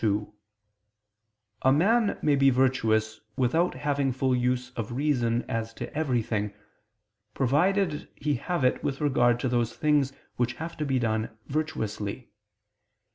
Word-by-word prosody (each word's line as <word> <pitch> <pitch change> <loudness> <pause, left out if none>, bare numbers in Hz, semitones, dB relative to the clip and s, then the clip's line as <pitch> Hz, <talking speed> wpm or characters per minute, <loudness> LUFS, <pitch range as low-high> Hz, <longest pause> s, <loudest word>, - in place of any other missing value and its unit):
2: 105 -1 0 1.3
A 130 - +4
man 205 - +3
may 150 -2 +4
be 135 0 +5
virtuous 115 -4 +1 0.2
without 160 +8 +1
having 140 -2 0
full 130 0 +1
use 125 0 0
of 115 -2 -5
reason 125 -4 +1
as 115 0 -3
to 120 +5 -7
everything, 115 -8 0 0.8
provided 165 +5 +1
he 150 +1 -1
have 160 +4 -2
it 125 - +2
with 135 - -2
regard 120 -5 +3
to 130 - -1
those 120 -2 0
things 150 -3 +2 0.3
which 120 0 0
have 165 +6 -6
to 150 - -3
be 135 -1 +1
done 110 -2 0 0.2
virtuously. 115 -7 -3
130 Hz, 135 wpm, -27 LUFS, 115-150 Hz, 1.3 s, be